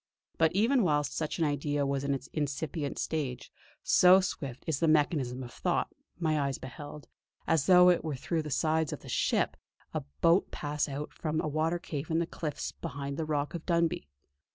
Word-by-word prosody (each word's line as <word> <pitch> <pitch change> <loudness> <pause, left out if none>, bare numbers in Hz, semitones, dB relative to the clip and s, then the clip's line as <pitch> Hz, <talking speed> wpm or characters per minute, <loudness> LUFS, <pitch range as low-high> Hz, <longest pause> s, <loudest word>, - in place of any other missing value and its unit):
But 160 -1 +4
even 235 +7 +3
whilst 145 -5 +1
such 155 -2 -2
an 165 - +2
idea 145 0 0
was 140 0 -1
in 140 0 +1
its 135 0 -7
incipient 145 0 -2
stage, 135 -6 -3 0.3
so 185 +1 +7
swift 140 -9 -4
is 155 -4 -1
the 165 - +2
mechanism 145 -5 +2
of 120 - -9
thought, - - -1 0.2
my 160 -3 +1
eyes 140 -2 -1
beheld, 145 +3 -9 0.4
as 160 -4 +2
though 180 -1 +8
it 175 - +1
were 155 -3 -2
through 160 +5 -2
the 150 - -6
sides 160 +2 +1
of - - -6
the - - -11
ship, - - +1 0.4
a - - -1 0.2
boat 170 +3 +4
pass 150 0 -2
out 145 +2 -5
from 155 -1 -2
a - - -1
watercave 155 -1 -2
in 160 - +1
the 170 - +1
cliffs 155 -3 -4
behind 140 0 -5
the 160 - -2
Rock 150 -1 -1
of 170 -2 -5
Dunbuy. 170 - +1
150 Hz, 190 wpm, -30 LUFS, 140-165 Hz, 0.4 s, though